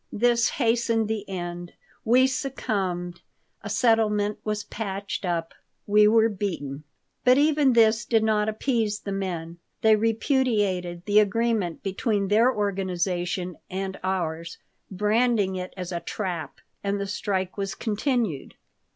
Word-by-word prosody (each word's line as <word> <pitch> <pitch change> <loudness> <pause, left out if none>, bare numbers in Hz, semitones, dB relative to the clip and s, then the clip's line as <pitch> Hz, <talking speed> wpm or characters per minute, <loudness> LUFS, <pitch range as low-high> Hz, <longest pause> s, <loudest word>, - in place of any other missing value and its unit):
This 235 +1 +3
hastened 230 -2 +1
the 210 -2 -3
end. 175 -2 -5 0.3
We 250 +3 +5
succumbed. 195 -10 -2 0.4
A - - -7
settlement 210 -3 +2
was 210 -1 -2
patched 200 -2 -5
up. 165 -2 -2 0.3
We 210 0 +5
were 225 +1 +5
beaten. 165 -9 -4 0.4
But 255 0 +5
even 295 -2 +4
this 225 0 +4
did 225 -2 +2
not 215 -1 +2
appease 220 -2 -1
the 200 - -5
men. 175 -4 -4 0.2
They 220 -1 +6
repudiated 215 - 0
the 210 0 +5
agreement 215 -4 0
between 200 0 -1
their 225 +5 +5
organization 185 -3 -2
and 190 +1 -4
ours, 170 -3 -2 0.3
branding 210 0 +1
it 185 0 -5
as 180 0 -5
a 170 - -2
trap, 180 -4 -5 0.2
and 200 0 -1
the 200 - -2
strike 195 -2 -2
was 195 -1 -3
continued. 220 - -1
205 Hz, 130 wpm, -25 LUFS, 185-225 Hz, 0.4 s, They